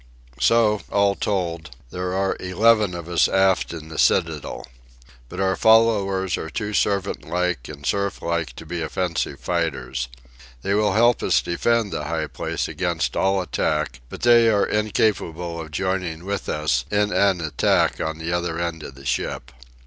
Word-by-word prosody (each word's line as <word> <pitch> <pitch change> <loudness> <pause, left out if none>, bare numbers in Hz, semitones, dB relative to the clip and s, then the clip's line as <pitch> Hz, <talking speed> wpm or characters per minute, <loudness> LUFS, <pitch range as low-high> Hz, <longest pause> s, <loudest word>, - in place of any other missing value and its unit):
So, 105 - +3
all 100 -1 +3
told, 85 -9 -3 0.2
there 90 0 -3
are 95 0 0
eleven 105 +1 +3
of 85 -1 -7
us 85 -1 +3
aft 95 -1 +2
in 80 -1 -8
the 80 - -6
citadel. - - +1 0.6
But - - -7
our 95 -1 +2
followers 100 -5 +3
are 80 - -5
too 105 +2 -4
servant 100 -1 0
like 90 -8 -2
and 70 -2 -9
serf 100 +4 -1
like 85 -2 -2
to 80 - -10
be 85 +1 -4
offensive 85 +1 -2
fighters. 65 -2 -2 0.6
They 100 - 0
will 105 -1 +2
help 120 +3 +4
us - - +3
defend 110 +4 0
the 75 - -3
high 80 0 -2
place - - -3
against - - -2
all 95 -1 +2
attack; 75 -6 -1
but - - -9
they 120 -1 +6
are 105 -2 +3
incapable 90 -5 -1
of 80 - -8
joining 90 0 -2
with 100 -1 -3
us 75 -5 0
in 105 0 +1
an 100 -3 +3
attack 80 -4 +1
on 80 0 -2
the 80 +1 -3
other 85 -1 -1
end 85 -2 -3
of 70 - -9
the 70 0 -14
ship. - - -2
90 Hz, 165 wpm, -23 LUFS, 80-100 Hz, 0.6 s, they